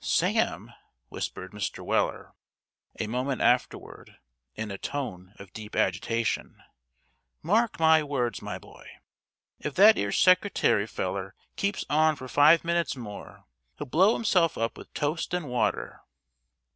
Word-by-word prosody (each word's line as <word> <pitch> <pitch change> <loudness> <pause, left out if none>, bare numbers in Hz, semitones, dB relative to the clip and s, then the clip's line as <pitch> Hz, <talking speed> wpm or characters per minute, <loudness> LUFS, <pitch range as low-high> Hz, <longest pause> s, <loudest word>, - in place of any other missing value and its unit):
"Sam," - - 0 0.4
whispered 95 - -6
Mr. 105 -3 -5
Weller, - - -1 0.7
a - - -1
moment 125 +4 -2
afterward, 125 +1 -1 0.4
in 110 -1 -5
a 100 - -6
tone 100 -9 -5
of 100 -2 -13
deep 110 0 -9
agitation, 115 +5 -1 0.8
"mark 220 +4 +1
my 160 -1 +5
words, 135 -5 -2
my - - -5
boy; - - -16 0.7
if 150 - -5
that 210 +3 +7
'ere 100 0 -1
secretary 185 - +3
feller 95 -1 -4 0.2
keeps 200 0 -2
on 155 +1 +3
for 130 -2 -9
five 150 +5 +5
minutes 170 -4 0
more, 105 -5 -10 0.3
he'll - - -5
blow 185 - +3
himself 180 -7 +2
up 115 0 -2
with - - -13
toast 155 +4 -2
and 175 -4 -3
water." 125 -1 -2
135 Hz, 130 wpm, -27 LUFS, 105-165 Hz, 0.8 s, that